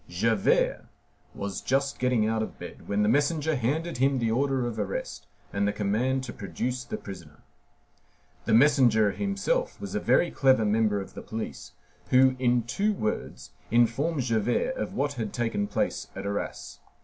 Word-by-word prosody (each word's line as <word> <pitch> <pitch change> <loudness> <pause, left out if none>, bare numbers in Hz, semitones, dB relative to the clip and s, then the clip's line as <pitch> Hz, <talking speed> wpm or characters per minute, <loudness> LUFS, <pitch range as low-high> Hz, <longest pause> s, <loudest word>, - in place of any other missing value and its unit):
Javert 105 +3 +1 0.5
was 100 -2 -4
just 135 +1 0
getting 125 -4 +2
out 110 0 0
of 110 - -5
bed - - -10
when 100 +1 +1
the - - +2
messenger 150 +5 +2
handed 150 +7 -1
him 135 +1 +3
the 115 -2 0
order 135 +1 +1
of 115 -2 -4
arrest 100 -2 -4 0.3
and 100 0 +1
the - - +2
command 110 +6 0
to 120 - -6
produce 120 +7 -4
the 120 - -5
prisoner. 85 -6 -11 1.0
The - - +1
messenger 120 -6 +5
himself 205 - -1
was - - -6
a - - 0
very 175 - +3
clever 130 -5 +3
member 105 -1 +2
of 95 - -8
the - - -8
police, 110 0 -6 0.4
who, 130 0 +5
in 120 -2 +2
two 200 - 0
words, 110 - -4 0.2
informed 125 +6 +2
Javert 125 - 0
of - - -4
what 145 +1 0
had 105 -2 -4
taken 115 -4 -1
place - - -2
at 95 +1 -6
Arras. 100 0 -4
120 Hz, 165 wpm, -27 LUFS, 105-135 Hz, 1.0 s, messenger